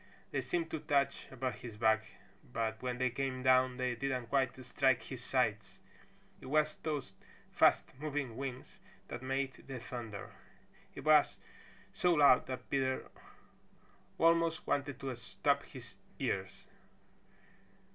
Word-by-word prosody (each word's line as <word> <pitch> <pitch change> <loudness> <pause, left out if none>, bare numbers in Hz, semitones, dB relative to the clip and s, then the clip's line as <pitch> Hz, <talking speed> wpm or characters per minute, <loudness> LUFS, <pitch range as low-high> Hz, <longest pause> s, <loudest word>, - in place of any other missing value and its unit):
They 135 - 0
seemed 165 +6 -2
to 160 - -2
touch 140 -2 0
above 130 -4 -3
his 115 -4 -8
back 110 -1 +3 0.4
but 110 -1 -3
when 125 -1 -2
they 130 0 +1
came 130 0 -2
down 130 -1 +4
they 125 -1 0
didn't 125 -1 -2
quite 130 -3 +1
strike 130 0 +2
his 130 -2 -8
sides. 110 -7 0 0.6
It - - -11
was 150 +2 +2
those 145 -10 -3 0.4
fast - - +4
moving 145 -5 -3
wings 130 -1 -6 0.3
that 120 - -5
made 135 +1 -3
the 135 -1 -5
thunder. 115 -4 -7 0.6
It - - -7
was 155 -1 +5 0.6
so 175 -1 +3
loud 140 -4 +6
that 130 -1 -5
Peter 130 -1 -1 1.1
almost 165 0 +3
wanted 140 -2 -1
to 135 -2 -3
stop 120 - 0
his - - -11 0.2
ears. 95 0 -3
130 Hz, 135 wpm, -34 LUFS, 120-140 Hz, 1.1 s, loud